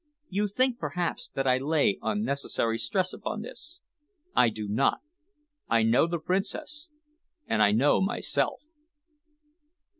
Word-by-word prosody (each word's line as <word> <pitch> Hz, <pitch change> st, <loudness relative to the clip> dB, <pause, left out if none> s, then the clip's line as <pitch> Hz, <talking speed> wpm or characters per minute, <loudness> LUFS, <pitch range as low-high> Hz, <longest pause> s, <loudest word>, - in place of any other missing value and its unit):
You 205 Hz, +2 st, 0 dB
think, 250 Hz, +4 st, +1 dB
perhaps, 175 Hz, -2 st, -3 dB
that 135 Hz, -, 0 dB
I 130 Hz, -1 st, +3 dB
lay 145 Hz, -7 st, +2 dB
unnecessary 140 Hz, -, -1 dB
stress 185 Hz, -, -1 dB
upon 215 Hz, -, -4 dB
this. 300 Hz, +9 st, -9 dB, 0.6 s
I 120 Hz, -, +5 dB
do 105 Hz, -1 st, -5 dB
not. 115 Hz, -, +1 dB, 0.7 s
I 115 Hz, -1 st, +4 dB
know 115 Hz, +8 st, +4 dB
the 170 Hz, 0 st, -1 dB
Princess 220 Hz, -, -3 dB, 0.6 s
and 110 Hz, -, 0 dB
I 105 Hz, -1 st, +6 dB
know 125 Hz, +8 st, +3 dB
myself." 195 Hz, +8 st, 0 dB
160 Hz, 125 wpm, -28 LUFS, -, 0.7 s, I